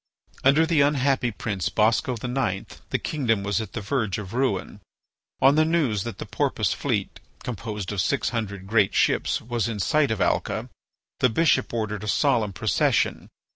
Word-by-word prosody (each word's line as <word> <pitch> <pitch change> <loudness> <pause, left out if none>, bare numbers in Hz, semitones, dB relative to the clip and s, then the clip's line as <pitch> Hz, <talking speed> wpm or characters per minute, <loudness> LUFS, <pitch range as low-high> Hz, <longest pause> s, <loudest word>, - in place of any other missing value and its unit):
Under 140 +4 +5
the 160 -3 +3
unhappy 140 -3 +2
prince 105 -4 -3
Bosco 110 +3 +2
IX. 120 -4 -2 0.2
the - - 0
kingdom 115 -9 -1
was 100 +2 0
at 110 - -8
the 110 - -4
verge 105 -2 -1
of 105 -1 -7
ruin. 105 -5 -1 0.6
On 135 +1 +6
the 155 +1 +4
news 150 - +1
that 115 - -5
the - - -6
Porpoise - - 0
fleet, - - -2 0.2
composed 105 -4 -5
of 100 -3 0
six 140 - 0
hundred 100 -5 -4
great 105 -1 +2
ships, - - +2
was 120 -1 -2
in 115 -2 -3
sight 145 +8 +2
of 110 -2 -1
Alca, - - -1 0.5
the 125 - +4
bishop 130 +1 +2
ordered 105 -3 -3
a - - -5
solemn 115 -4 +2
procession. - - 0
115 Hz, 170 wpm, -25 LUFS, 105-135 Hz, 0.6 s, On